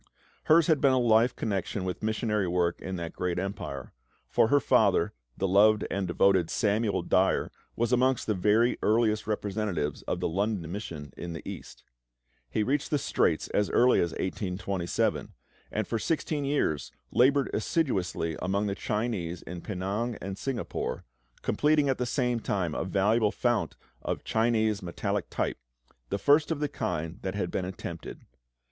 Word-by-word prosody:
Hers 160 +1 +6
had 155 -4 +3
been 135 -2 +5
a - - +3
life 120 0 +4
connection 100 -2 -2
with 90 -1 -4
missionary 110 -2 0
work 85 -1 0
in 95 - -4
that 85 -2 -5
great 90 -1 -2
empire; 90 - -5 0.3
for - - +3
her 145 +5 +4
father, - - +3 0.2
the 95 - 0
loved 105 +3 +5
and 100 -1 -1
devoted 90 -1 +3
Samuel 105 0 +1
Dyer, - - +2 0.2
was 120 +1 0
amongst 130 0 +2
the 110 - +1
very 105 +5 +2
earliest 110 -1 +2
representatives 100 -7 -2
of - - -1
the - - 0
London 95 -1 -1
Mission 80 -8 -6
in 85 -1 -6
the 80 - -8
East. - - -8 0.7
He 105 - 0
reached 140 +5 0
the 150 - +2
Straits - - +1
as 105 - +1
early 125 +1 +4
as 85 - +2
1827, 95 -1 -2 0.4
and 110 -1 -2
for 115 - -1
sixteen 150 +2 -1
years 135 - 0 0.2
laboured 135 +2 +3
assiduously 95 - 0
amongst 100 +2 0
the - - -1
Chinese 100 -6 -2
in 90 -1 -7
Penang 105 +5 -3
and 95 0 -5
Singapore, 130 +3 -3 0.4
completing 150 -1 +2
at 130 - 0
the 125 - 0
same 125 -2 0
time 95 -7 -1
a - - -2
valuable 105 +3 +2
fount 120 0 0 0.3
of - - -3
Chinese 110 -2 +1
metallic 85 -2 -3
type, - - -2 0.5
the 100 - -1
first 145 +8 +4
of 160 -3 -1
the 150 -1 -1
kind 80 +2 -3
that 95 0 -3
had 90 -4 -2
then - - -1
been - - -4
attempted. 85 -3 -8
105 Hz, 165 wpm, -28 LUFS, 90-120 Hz, 0.7 s, Hers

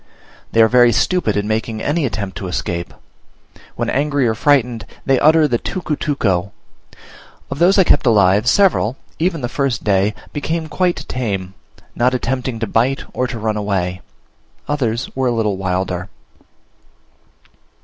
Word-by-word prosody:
They 115 - +5
are - - +5
very 120 0 +5
stupid 115 - +1
in 105 0 -1
making 110 0 -2
any 145 +4 0
attempt 100 -5 -5
to 95 - -5
escape; 85 -1 -3 0.8
when - - -2
angry 140 -2 +1
or 110 - +1
frightened 125 -2 +1 0.2
they 135 -2 +3
utter 155 0 +5
the 120 -4 0
tucutuco. 140 - -1 1.0
Of - - -4
those 180 +4 +4
I 190 - +7
kept 145 -6 +3
alive 105 +1 +4
several, 155 - +3 0.2
even 165 -2 0
the 120 - -1
first 130 -1 -2
day, 100 +1 +2 0.2
became 160 +2 -2
quite 175 -4 -1
tame, 100 -7 -3 0.4
not 125 +2 +1
attempting 125 -1 -2
to - - +1
bite 120 +6 0
or 130 - -1
to 120 - -5
run 110 -1 -1
away; 95 -3 -2 0.7
others 130 -4 -1
were 130 -1 0
a - - +2
little 105 -4 0
wilder. 95 0 -2
120 Hz, 150 wpm, -18 LUFS, 105-145 Hz, 1.0 s, I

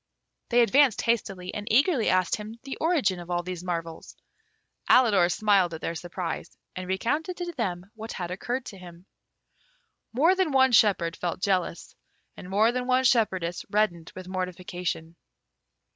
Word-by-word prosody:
They 240 0 +4
advanced 260 0 +4
hastily, 195 -6 -1
and 210 0 -6
eagerly 265 - +3
asked 185 -1 +2
him 215 +2 -8
the 270 - -6
origin 280 - +1
of 175 0 -10
all 175 0 -1
these 180 -1 -6
marvels. 165 -2 -5 0.7
Alidor 205 -8 +5
smiled 195 -5 +2
at 160 - -9
their 165 - -3
surprise, 175 0 -6 0.2
and 185 0 -6
recounted 295 - -1
to 350 -1 -4
them 195 - -4
what 220 0 -8
had 175 -1 -5
occurred 245 +7 -3
to 195 - -9
him. 175 0 -13 1.1
More 310 +10 +4
than 375 -4 0
one 265 -1 +5
shepherd 190 -7 +3
felt 175 0 -3
jealous, 185 -3 -1 0.4
and 180 - -10
more 215 +4 +3
than 250 0 -3
one 255 0 +3
shepherdess 190 -9 +1
reddened 195 -6 0
with 185 -1 -9
mortification. 180 -2 -4
195 Hz, 155 wpm, -26 LUFS, 180-240 Hz, 1.1 s, Alidor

